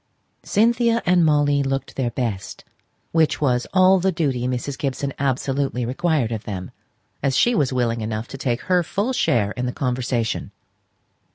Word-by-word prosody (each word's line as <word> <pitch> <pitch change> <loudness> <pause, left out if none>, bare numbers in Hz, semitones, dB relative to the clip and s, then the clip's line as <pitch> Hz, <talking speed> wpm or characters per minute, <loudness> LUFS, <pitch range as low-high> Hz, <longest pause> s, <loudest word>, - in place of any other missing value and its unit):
Cynthia 230 +2 +2
and 180 -1 +4
Molly 145 -2 +3
looked 135 0 -3
their 130 -3 0
best, 115 -6 -4 0.5
which 160 -2 +2
was 125 -4 +1
all 185 0 +5
the 190 +2 +1
duty 135 -8 -1
Mrs. 130 +2 -3
Gibson 135 0 -3
absolutely 135 -1 -1
required 135 -1 0
of 110 -2 -4
them, 95 -3 -5 0.5
as 135 -1 +1
she 240 - +4
was 145 - +1
willing 120 -3 0
enough 110 +1 -3
to - - -7
take 120 -3 -1
her 180 +6 +2
full 200 +9 -2
share 105 - +1
in 125 +2 -3
the - - -1
conversation. 125 -3 -2
135 Hz, 160 wpm, -22 LUFS, 120-165 Hz, 0.5 s, all